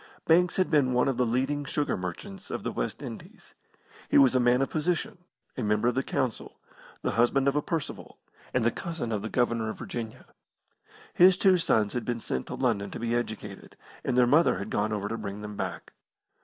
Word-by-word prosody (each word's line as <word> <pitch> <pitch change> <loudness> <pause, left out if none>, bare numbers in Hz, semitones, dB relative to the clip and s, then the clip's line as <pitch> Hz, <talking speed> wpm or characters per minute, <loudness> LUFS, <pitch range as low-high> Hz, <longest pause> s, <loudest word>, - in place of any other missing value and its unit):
Banks 175 +2 +4
had 185 -2 +1
been 140 -5 +3
one 125 +3 +3
of 135 - 0
the 125 - +2
leading 135 +5 0
sugar 145 +1 -1
merchants 90 +1 -7
of - - -4
the - - -2
West - - -4
Indies. - - -10 0.6
He - - +4
was 135 -2 +6
a 130 - +3
man 125 +2 +3
of - - -4
position, 170 +2 -1 0.4
a - - -4
member 105 +1 +1
of - - -1
the 135 - +1
Council, 130 -3 -3 0.5
the - - 0
husband 125 +4 +2
of 140 - +2
a 150 - +2
Percival, 160 -1 -5 0.3
and 125 - +1
the 120 - +4
cousin 165 -8 -4
of 105 -2 -1
the 110 - -4
Governor 115 -2 0
of - - -6
Virginia. 115 -2 -6 0.9
His 180 +1 +6
two 190 -2 +4
sons 110 - +2
had 125 - -2
been 120 -1 -2
sent 65 - -3
to - - -5
London 100 0 0
to - - -7
be 115 0 -1
educated, 110 -4 -4 0.3
and 125 - 0
their 125 - +6
mother 150 - +4
had 100 +3 -6
gone 105 +1 0
over 105 -1 -2
to 115 +1 -4
bring 100 -1 -6
them 105 0 -7
back. - - -5
120 Hz, 210 wpm, -28 LUFS, 110-145 Hz, 0.9 s, was